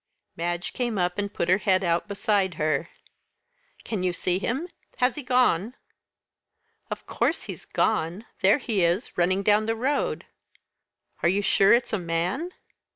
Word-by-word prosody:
Madge 175 +1 -3
came 240 -4 -2
up 180 +1 0
and 200 0 -2
put 170 - -2
her 185 +2 +4
head 190 -3 +2
out 170 +1 +1
beside 200 -2 0
her. 155 +1 0 0.9
"Can 215 -5 -3
you 180 -1 0
see 180 +1 0
him? 265 - -2 0.3
Has 250 0 +2
he 295 - -6
gone?" 250 -4 +2 1.1
"Of - - -6
course - - 0
he's - - -8
gone 195 0 0 0.2
there 195 +5 +5
he 225 -8 0
is, 175 +7 0
running 185 +3 +2
down 210 +1 +3
the 225 - +1
road." 265 +6 -1 1.0
"Are 170 - +3
you 200 +3 +1
sure 195 0 +4
it's 240 -1 +1
a 215 - +1
man?" 175 - -1
195 Hz, 155 wpm, -26 LUFS, 175-225 Hz, 1.1 s, there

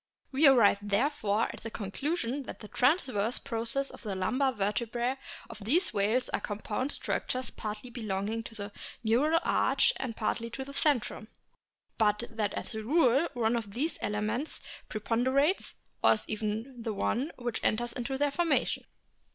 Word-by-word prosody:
We 285 +3 +6
arrive 230 -7 +6
therefore 210 0 +1
at - - -10
the 225 - -5
conclusion 250 - -2
that - - -8
the 210 - -8
transverse 250 - +2
processes 250 +2 -1
of - - -12
the 205 -4 -3
lumbar 255 +9 +1
vertebrae 235 +3 -1 0.3
of 225 - -10
these 320 - +3
whales 215 +5 +2
are - - 0
compound 215 +6 -2
structures 255 -3 -2
partly 215 +3 -6
belonging 215 -1 -2
to 225 - -9
the 205 -1 -6 0.3
neural 280 +9 +3
arch - - +3
and 245 -4 -4
partly 230 +1 -1
to 265 +3 -5
the 280 - -9
centrum, 280 -7 +1 0.7
but 210 0 +3
that 215 -3 -1
as - - -4
a 220 - -3
rule 275 +4 +4
one 230 -1 +2
of 220 -3 -4
these 305 +7 0
elements 215 +8 -1 0.3
preponderates, 260 - +1 0.3
or - - +8
is 215 - -3
even 220 +4 -3
the 230 - -3
only 210 - -4
one 275 +8 0
which 240 -2 -3
enters 235 +2 +1
into 255 +2 -2
their 290 +1 +2
formation. 335 +2 +1
235 Hz, 160 wpm, -30 LUFS, 215-270 Hz, 0.7 s, or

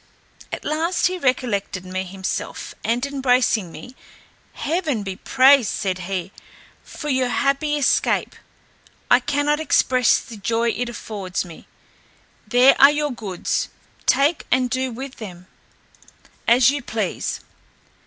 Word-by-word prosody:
At - - -6
last 330 +4 0
he 370 0 0
recollected 235 - -1
me 185 +1 -3
himself, 190 0 -5
and 240 +3 0
embracing 250 -8 +1
me, 250 +8 -11 0.6
"Heaven 305 - -2
be 190 -1 -5
praised," 260 -1 +5
said 190 -3 -2
he, 190 -1 -3 0.5
"for 300 - -8
your 260 -2 +1
happy 275 +5 +1
escape. 285 - +1 0.8
I - - +7
cannot 290 +3 0
express 255 -5 +3
the 225 - -11
joy 230 +3 0
it 240 +1 -2
affords, 200 -5 -4
me; 170 -2 -13 0.8
there 255 +2 +6
are 280 - +10
your 295 0 -1
goods, 205 -7 -3 0.4
take 290 +4 +2
and 255 -1 +1
do 260 0 -1
with 265 +3 -8
them 185 -6 -9 1.0
as 240 +2 +6
you 285 0 -3
please." - - -3
250 Hz, 125 wpm, -22 LUFS, 205-280 Hz, 1.0 s, are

